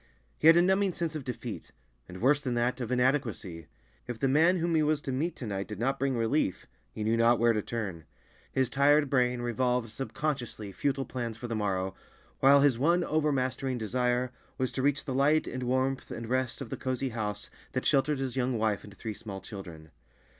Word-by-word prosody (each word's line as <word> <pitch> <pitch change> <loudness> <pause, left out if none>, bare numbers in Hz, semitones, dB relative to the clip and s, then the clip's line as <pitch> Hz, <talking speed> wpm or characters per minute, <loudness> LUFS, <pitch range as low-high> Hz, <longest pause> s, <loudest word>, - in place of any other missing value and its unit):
He 155 - +4
had 165 +1 +9
a 175 - +6
numbing 190 +1 +2
sense 165 -2 -2
of 150 - -4
defeat, 120 -2 -6 0.4
and 90 +1 -9
worse 140 +4 +4
than 130 -4 -2
that, 120 +2 0
of 120 - -3
inadequacy. 120 - 0 0.4
If 120 - -4
the 135 - +1
man 160 +7 +4
whom 170 0 0
he 160 - +4
was 155 0 +2
to 135 - -4
meet 155 +7 -1
to 125 - -7
night 100 -2 -3
did 105 - -6
not 135 +5 0
bring 135 -2 0
relief, 115 - 0 0.3
he 105 - -5
knew 110 +2 +2
not 115 +1 +4
where 115 0 +4
to 105 - 0
turn. 100 -8 -5 0.5
His 130 -1 +1
tired 145 +2 +3
brain 125 -2 +2
revolved 125 -1 0
subconsciously 135 -4 -3
futile 135 +5 -1
plans 120 -3 -4
for 120 - -6
the 115 - -3
morrow, 95 -3 -1 0.5
while 140 +1 +6
his 135 -5 +3
one 170 +5 +3
overmastering 135 -5 0
desire 125 +2 0 0.3
was 130 -1 -1
to 130 - -2
reach 145 +1 +1
the 135 - -3
light 145 +4 +3
and 130 - -5
warmth 130 +2 0
and 115 0 -6
rest 130 +1 -1
of 120 - -7
the - - -3
cozy 130 0 -2
house 105 -3 -4 0.2
that 130 - -2
sheltered 140 +1 +3
his 130 -2 -3
young 125 -2 0
wife 110 -2 0
and 105 -1 -13
three 110 -2 -5
small 100 -2 -7
children. 85 -6 -10
125 Hz, 205 wpm, -29 LUFS, 115-140 Hz, 0.5 s, had